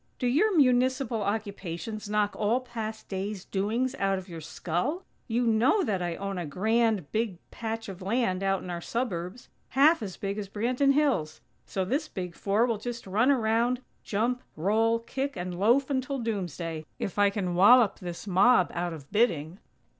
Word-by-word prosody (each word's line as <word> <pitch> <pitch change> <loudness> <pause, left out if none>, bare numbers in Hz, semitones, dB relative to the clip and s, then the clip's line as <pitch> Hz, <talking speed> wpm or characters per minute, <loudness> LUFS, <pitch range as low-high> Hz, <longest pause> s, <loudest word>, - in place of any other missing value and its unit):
_ - - -42
Do 255 - -2
your 345 - +3
Municipal 255 -3 +3
occupations 205 0 -4
knock 210 -1 +1
all 215 +4 +1
past 220 -3 -6
days' 195 0 -4
doings 225 +6 -1
out 195 -1 +1
of 185 0 -7
your 165 -3 -8
skull? 180 - -3 0.2
You 240 +1 +1
know 235 - +3
that 195 -5 -1
I 175 -1 -2
own 195 0 -4
a 175 - -3
grand, 215 +1 +1
big 220 -4 -1
patch 225 0 -4
of 190 -1 -8
land 195 -2 0
out 195 0 0
in 180 - -6
our 170 -1 -4
suburbs, 215 -1 -3 0.2
half 295 +4 +5
as 195 -5 -6
big 200 0 -3
as 200 -2 -5
Branton 250 +7 +2
Hills. 260 - +1 0.3
So 190 -1 -2
this 285 - -1
Big 180 -3 -5
Four 205 +6 +1
will 230 -4 -1
just 235 +1 -5
run 210 +7 +2
around, 240 -1 +2 0.2
jump, 235 +4 0
roll, 220 +7 +2
kick, 265 +2 -4
and 175 0 -4
loaf 250 +7 +3
until 270 +1 -1
doomsday, 175 - -3
if 200 - -4
I 205 0 +5
can 195 -3 -2
wallop 210 +5 +6
this 175 0 -6
mob 195 +1 +4
out 175 0 -2
of 145 -4 -10
bidding." 180 -6 +1
215 Hz, 175 wpm, -28 LUFS, 185-245 Hz, 0.3 s, wallop